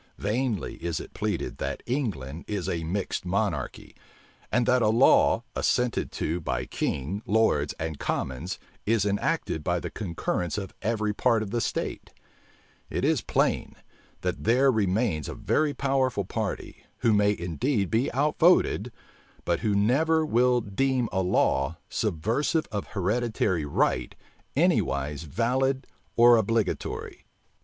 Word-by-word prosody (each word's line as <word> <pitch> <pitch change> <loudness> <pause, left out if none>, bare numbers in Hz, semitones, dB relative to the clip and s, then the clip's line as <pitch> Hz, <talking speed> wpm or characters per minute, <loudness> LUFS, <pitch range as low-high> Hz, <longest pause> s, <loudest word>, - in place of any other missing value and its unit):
Vainly 110 -1 -1
is 85 -2 -1
it - - -9
pleaded - - -2
that - - -3
England 90 - -3
is 100 -5 -3
a 85 -1 -2
mixed 95 +4 -2
monarchy; 90 - -2 0.6
and 120 -1 +2
that 125 +1 +3
a 110 - +3
law, 115 +2 +5
assented 125 -2 0
to 85 +3 -2
by 65 -5 -2
king, 75 +10 -2
lords, 105 -9 +2
and 80 -2 -4
commons, 75 +10 -3 0.3
is 110 -2 +2
enacted 100 -6 -1
by 90 +1 0
the - - -6
concurrence 90 -3 -2
of 100 -2 -5
every 110 -1 0
part 115 0 +2
of 100 - -7
the 120 0 0
state: - - -3 0.8
it - - -1
is - - +2
plain, - - 0 0.5
that 90 0 -2
there 130 +4 +4
remains 100 - 0
a - - -5
very 155 -1 +1
powerful 130 -6 0
party, - - -4 0.2
who 115 - +4
may 105 0 +3
indeed 90 - -1
be 115 +4 +1
outvoted, 145 - +3 0.5
but - - +1
who 105 -2 0
never 155 +10 +3
will 125 -2 +3
deem 125 +4 0
a 95 - +1
law, 80 -4 +1
subversive 115 - 0
of 105 -2 -3
hereditary 105 -4 0
right, 65 -3 0 0.4
anywise 70 +1 +1
valid 130 - 0 0.3
or 120 0 +7
obligatory. 110 -2 -2
105 Hz, 135 wpm, -27 LUFS, 90-120 Hz, 0.8 s, or